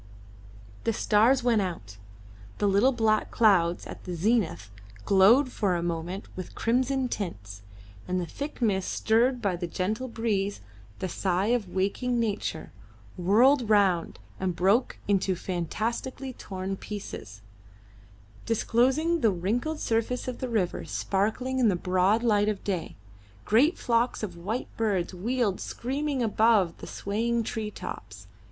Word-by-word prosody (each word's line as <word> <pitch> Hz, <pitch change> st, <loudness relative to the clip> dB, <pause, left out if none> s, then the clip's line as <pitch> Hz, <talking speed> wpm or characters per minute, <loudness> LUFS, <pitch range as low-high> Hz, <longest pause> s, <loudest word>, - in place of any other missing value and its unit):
The 230 Hz, -, +1 dB
stars 230 Hz, +5 st, +3 dB
went 235 Hz, -4 st, +3 dB
out; 110 Hz, -, -5 dB, 0.6 s
the 205 Hz, -, +1 dB
little 200 Hz, +7 st, +4 dB
black 220 Hz, -3 st, +1 dB
clouds 180 Hz, -6 st, +3 dB
at -, -, -9 dB
the 180 Hz, -, -5 dB
zenith 170 Hz, -, 0 dB, 0.3 s
glowed 230 Hz, +8 st, +5 dB
for 195 Hz, -6 st, 0 dB
a 170 Hz, -, -2 dB
moment 175 Hz, +3 st, -3 dB
with 185 Hz, -2 st, -7 dB
crimson 260 Hz, +3 st, +1 dB
tints, 100 Hz, -, -5 dB, 0.5 s
and 185 Hz, 0 st, 0 dB
the 175 Hz, -, -2 dB
thick 285 Hz, -, -6 dB
mist, 190 Hz, -4 st, +1 dB
stirred 240 Hz, +2 st, +2 dB
by 195 Hz, -3 st, +1 dB
the 175 Hz, 0 st, -4 dB
gentle 215 Hz, +9 st, -2 dB
breeze, 210 Hz, -4 st, -1 dB, 0.4 s
the 185 Hz, -, -3 dB
sigh 190 Hz, +4 st, 0 dB
of 220 Hz, -7 st, -1 dB
waking 235 Hz, +6 st, 0 dB
nature, 205 Hz, -7 st, -2 dB, 0.4 s
whirled 230 Hz, +7 st, +4 dB
round 195 Hz, -5 st, +3 dB, 0.2 s
and 185 Hz, -2 st, -1 dB
broke 195 Hz, +8 st, +2 dB
into 195 Hz, -2 st, +2 dB
fantastically 225 Hz, -, -3 dB
torn 190 Hz, -3 st, -5 dB
pieces, 110 Hz, -, -8 dB, 1.1 s
disclosing 265 Hz, +9 st, +2 dB
the 225 Hz, -, +5 dB
wrinkled 235 Hz, -, -2 dB
surface 230 Hz, +3 st, -1 dB
of 255 Hz, -, -4 dB
the 255 Hz, -, -3 dB
river 205 Hz, -7 st, -1 dB
sparkling 220 Hz, +7 st, -1 dB
in 245 Hz, -, +4 dB
the 190 Hz, -, +2 dB
broad 185 Hz, +5 st, +2 dB
light 210 Hz, -3 st, +3 dB
of 210 Hz, -2 st, -3 dB
day. 185 Hz, -5 st, -3 dB, 0.5 s
Great 270 Hz, -, +4 dB
flocks 235 Hz, -1 st, 0 dB
of 185 Hz, -5 st, -4 dB
white 200 Hz, +8 st, -4 dB
birds 195 Hz, -6 st, 0 dB
wheeled 215 Hz, +1 st, -1 dB
screaming 275 Hz, +1 st, -2 dB
above 215 Hz, -5 st, +3 dB
the -, -, -8 dB
swaying 230 Hz, +3 st, -1 dB
tree 215 Hz, -1 st, -3 dB
tops. -, -, -8 dB
210 Hz, 140 wpm, -27 LUFS, 185-240 Hz, 1.1 s, glowed